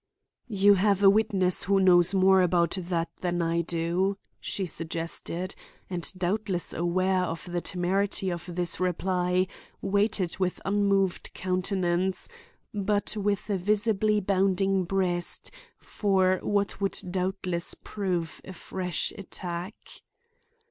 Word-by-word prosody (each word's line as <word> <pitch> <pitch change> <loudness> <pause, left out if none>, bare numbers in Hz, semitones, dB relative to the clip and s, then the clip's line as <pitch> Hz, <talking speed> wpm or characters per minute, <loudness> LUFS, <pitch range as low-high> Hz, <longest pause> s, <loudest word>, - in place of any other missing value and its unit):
"You 205 -1 +5
have 200 0 +2
a 195 - +9
witness 195 -4 +1
who 195 +1 +3
knows 180 -2 +6
more 190 -1 +5
about 170 -2 +2
that 170 -2 -2
than 175 -1 -2
I 170 0 +1
do," 170 +4 0 0.2
she 195 - -3
suggested; 165 +2 -4 0.4
and 175 -2 -1
doubtless 185 0 -1
aware 185 +2 +1
of 165 -2 -3
the 175 0 -2
temerity 190 +2 0
of 170 -1 -4
this 175 -1 -1
reply, 180 0 +1 0.3
waited 195 -3 0
with 185 -1 0
unmoved 195 -2 +1
countenance, 185 0 0 0.4
but 205 +1 0
with 205 -1 -1
a 200 - +1
visibly 210 +2 +2
bounding 195 -1 +1
breast, 175 -2 -1 0.3
for 190 -3 +1
what 200 -1 -1
would 195 - 0
doubtless 185 -2 -1
prove 180 -5 -3
a 190 - -9
fresh 180 -1 -3
attack. 180 0 -5
185 Hz, 120 wpm, -27 LUFS, 175-195 Hz, 0.4 s, a